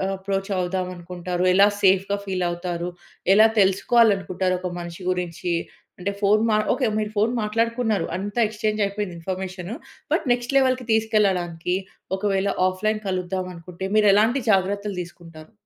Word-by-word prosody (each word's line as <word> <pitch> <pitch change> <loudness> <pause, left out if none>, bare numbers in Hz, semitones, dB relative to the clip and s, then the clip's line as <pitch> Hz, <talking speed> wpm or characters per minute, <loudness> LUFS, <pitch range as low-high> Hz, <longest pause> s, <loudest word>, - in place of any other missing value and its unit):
Approach 195 +1 -3
అవుదామనుకుంటారు? 180 -1 -3
ఎలా 200 +2 +6
సేఫ్‌గా 195 +1 +3
ఫీలవుతారు? 175 -2 -2 0.4
ఎలా 215 +2 +7
తెలుసుకోవాలనుకుంటారు 195 -2 +3
ఒక 180 0 -4
మనిషి 170 +1 -8
గురించి? 175 -1 -2 0.5
అంటే 195 +3 -2
ఫోను 210 +2 +4
మా 215 - +4 0.2
ఓకే, 265 - 0
మీరు 210 0 -2
ఫోను 215 +3 +2
మాట్లాడుకున్నారు. 225 -2 0
అంతా 205 +4 -4
ఎక్స్‌చేంజ్ 215 0 -2
అయిపోయింది 200 -2 -4
ఇన్ఫర్మేషను. 185 +3 -5 0.4
బట్ - - +1
నెక్స్ట్ 245 +2 -3
లెవెల్‌కి 255 -2 +2
తీసుకెళ్లడానికి 190 -6 +1 0.4
ఒకవేళ 195 -1 0 0.2
ఆఫ్లైన్ 215 +3 -1
కలుద్దామనుకుంటే 180 -1 -4
మీరు 210 -1 +5
ఎలాంటి 225 +6 +3
జాగ్రత్తలు 200 +1 0
దీసుకుంటారు? 165 -2 -12
195 Hz, 125 wpm, -23 LUFS, 180-215 Hz, 0.5 s, ఎలా